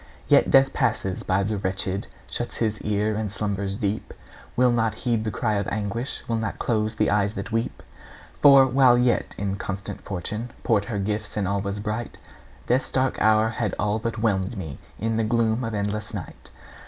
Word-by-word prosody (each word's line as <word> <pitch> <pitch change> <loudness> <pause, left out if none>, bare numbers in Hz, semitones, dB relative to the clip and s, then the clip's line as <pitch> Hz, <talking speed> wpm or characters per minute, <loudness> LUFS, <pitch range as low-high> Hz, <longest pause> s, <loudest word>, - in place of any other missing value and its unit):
Yet - - +5
Death 135 0 +5
passes 95 -1 0
by 95 +1 +1
the 105 +1 -1
wretched, 95 0 -2 0.2
Shuts - - -4
his 110 -2 -1
ear 105 +1 0
and 105 -1 -2
slumbers 100 -2 -2
deep; 105 -1 -3 0.4
Will 125 0 +4
not 115 -2 +1
heed 115 -2 -1
the - - 0
cry 110 +2 -1
of 100 - -1
anguish, 110 +5 -3
Will 115 - 0
not 110 -2 -3
close 110 -2 0
the 110 -1 +2
eyes 105 0 +1
that 100 +3 -5
weep. 115 +1 -2 0.6
For, 140 -2 +8
while 130 -1 +5
yet 125 0 +1
inconstant 100 0 -4
Fortune 105 +5 -4
Poured 110 -4 +2
her 115 -3 -3
gifts 105 +1 -2
and 100 -3 0
all 100 0 0
was 100 0 -3
bright, 110 +3 -4 0.5
Death's 125 +2 +1
dark 130 0 0
hour 110 0 +4
had 115 -3 -2
all 105 +1 0
but 115 0 -3
whelmed 105 -1 0
me 80 -8 -6 0.2
In 115 0 -1
the 115 - +2
gloom 115 +1 +1
of 115 -2 -3
endless 105 +1 -2
night. - - -8
110 Hz, 185 wpm, -25 LUFS, 100-115 Hz, 0.6 s, For